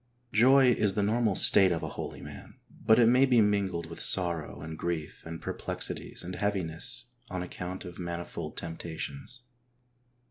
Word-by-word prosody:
Joy 130 +4 +6
is 105 -4 +1
the 105 - +1
normal 110 -1 +1
state 95 0 +6
of 85 - -2
a - - -3
holy - - -7
man, - - -11 0.2
but 110 - +3
it 120 - +6
may 125 +4 +5
be 125 -3 +4
mingled 100 -5 +1
with - - -9
sorrow 85 -5 -1
and 80 0 -6
grief 80 -2 -4
and 80 0 -6
perplexities - - -4
and 90 +1 -6
heaviness 100 +6 -3 0.2
on 90 -1 -3
account 90 +1 -6
of 90 0 -9
manifold 85 -2 -5
temptations. 85 - -6
95 Hz, 155 wpm, -29 LUFS, 85-115 Hz, 0.2 s, Joy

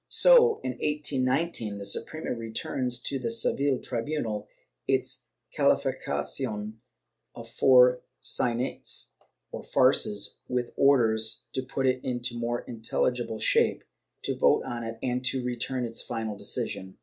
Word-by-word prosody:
So, 475 -2 +6
in 130 - -1
1819, 140 -5 0
the 100 - -7
Suprema 115 +10 -3
returns 120 +2 -2
to 135 +2 -2
the 120 -2 -2
Seville 135 +4 +1
tribunal 115 -4 -3 0.4
its - - -1 0.3
calificacion 105 +1 -1 0.6
of 115 - -9
four 125 +1 +5 0.2
saynetes, 120 +2 -1 0.4
or - - -6
farces, 105 -1 +2
with 125 -1 -2
orders 115 -6 +3
to 130 - -1
put 135 +1 -3
it 130 -1 +1
into 120 -1 -2
more 120 0 -2
intelligible 120 0 -2
shape, 110 - +2 0.4
to - - -1
vote - - +3
on 120 -1 -4
it 115 0 -5
and 125 0 -1 0.2
return 125 +1 -2
it 115 -1 -7
for - - -4
final 110 -3 -3
decision. 95 -1 -4
120 Hz, 125 wpm, -27 LUFS, 115-130 Hz, 0.6 s, So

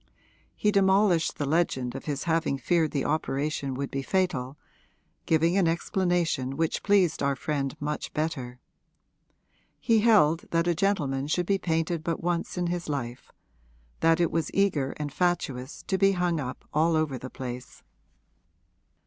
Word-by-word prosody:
He 210 - +1
demolished 190 -4 +3
the 145 - -1
legend 135 -5 0
of 135 - -7
his 145 -2 -3
having 165 -4 0
feared 165 +2 +1
the 140 -3 -2
operation 145 -2 -1
would 140 +1 -4
be 135 - -2
fatal, 145 -6 -1 0.7
giving 165 +2 +3
an 185 -4 +3
explanation 170 -5 0
which 165 -1 0
pleased 195 -5 +2
our 140 0 +1
friend 135 0 -3
much 150 +1 -3
better. 135 -6 -3 1.2
He 225 -2 +3
held 185 -8 +4
that 165 0 +1
a 175 - +3
gentleman 155 -8 0
should 175 +3 0
be 195 +1 +1
painted 165 -1 -1
but 165 0 -2
once 175 +1 -1
in 175 - 0
his 175 -1 -3
life 125 -4 -4 0.7
that 165 0 +3
it 170 - +2
was 165 -2 -1
eager 160 -9 +1
and 145 -2 -4
fatuous 150 -7 -1
to 190 - -1
be 195 0 +4
hung 175 -3 0
up 130 -3 -6
all 160 +2 +3
over 155 -5 0
the 130 - -7
place. 125 -2 -8
160 Hz, 155 wpm, -27 LUFS, 140-175 Hz, 1.2 s, held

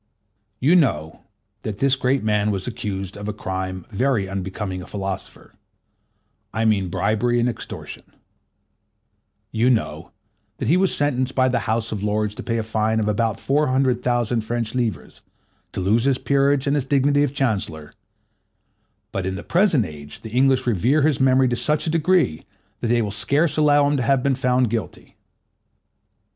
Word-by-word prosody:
You 150 +8 +4
know 95 - 0 0.4
that 105 -2 -5
this 135 +3 +3
great 130 0 0
man 105 -1 +1
was 95 -2 -2
accused 95 -4 -4
of 105 0 -7
a 105 - -2
crime 95 -3 -4
very 115 -2 0
unbecoming 95 0 -4
a - - -10
philosopher: 95 -2 -6 1.0
I 110 +1 -1
mean 100 -4 +2
bribery 110 +6 +1
and 120 - +2
extortion. 120 - -6 1.5
You 115 +3 +2
know 120 -4 -1 0.5
that - - -3
he 165 - +5
was 190 0 +2
sentenced 130 -3 0
by 130 -1 +3
the 125 -1 +1
House 115 0 0
of 105 -3 -3
Lords 105 0 -1
to - - -7
pay 115 -1 -2
a 115 - -1
fine 110 0 0
of 105 - -1
about 110 +1 0
four 145 +5 +1
hundred 130 -1 +1
thousand 120 -2 0
French 115 0 -2
livres, 115 - -3 0.5
to - - -5
lose 105 +6 +2
his 135 -2 +2
peerage 140 0 +2
and 140 0 +1
his 140 -3 0
dignity 140 +1 +2
of 145 -1 0
Chancellor; 95 - -2 1.2
but 95 -1 -3
in 95 - -2
the - - -7
present 170 - +2
age 75 -3 -10
the 110 - -9
English 130 +2 +3
revere 125 - +2
his 150 -3 +2
memory 130 0 +4
to 120 - 0
such 150 +5 0
a 160 - 0
degree, 165 - +2 0.4
that 120 - -2
they 120 0 +2
will 105 - -3
scarce 140 - +1
allow 145 -2 +4
him 145 0 +1
to - - 0
have 125 +1 +2
been 140 - +2 0.3
guilty. 115 -3 -4
120 Hz, 170 wpm, -22 LUFS, 105-135 Hz, 1.5 s, he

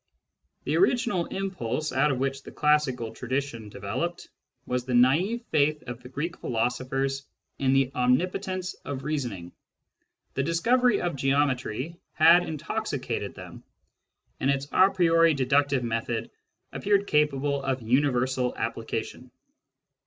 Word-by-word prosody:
The - - 0
original 240 - +2
impulse 155 -7 -3
out 135 +3 +3
of 135 - 0
which 135 +1 -2
the - - -11
classical 140 -6 +1
tradition 125 -3 -3
developed 130 - -4 0.4
was 125 0 -1
the 125 0 -2
naive 170 - +3
faith 150 +1 +2
of 125 -1 -7
the 125 - -11
Greek 150 +6 -4
philosophers 130 +4 -1 0.3
in 135 -1 +2
the 135 -1 +3
omnipotence 180 +8 0
of 140 -2 -5
reasoning. 120 - -3 0.8
The 135 - 0
discovery 230 - +2
of 175 -4 -1
geometry 135 +1 0 0.2
had 165 +3 +7
intoxicated 160 -4 -3
them, - - -10 0.8
and 135 - +1
its 140 0 0
a 190 +1 +6
priori 165 -4 +4
deductive 140 0 +2
method 115 0 -2 0.4
appeared 200 0 +1
capable 145 -3 +1
of 135 -2 -2
universal 130 0 +1
application. - - -4
140 Hz, 125 wpm, -27 LUFS, 125-165 Hz, 0.8 s, had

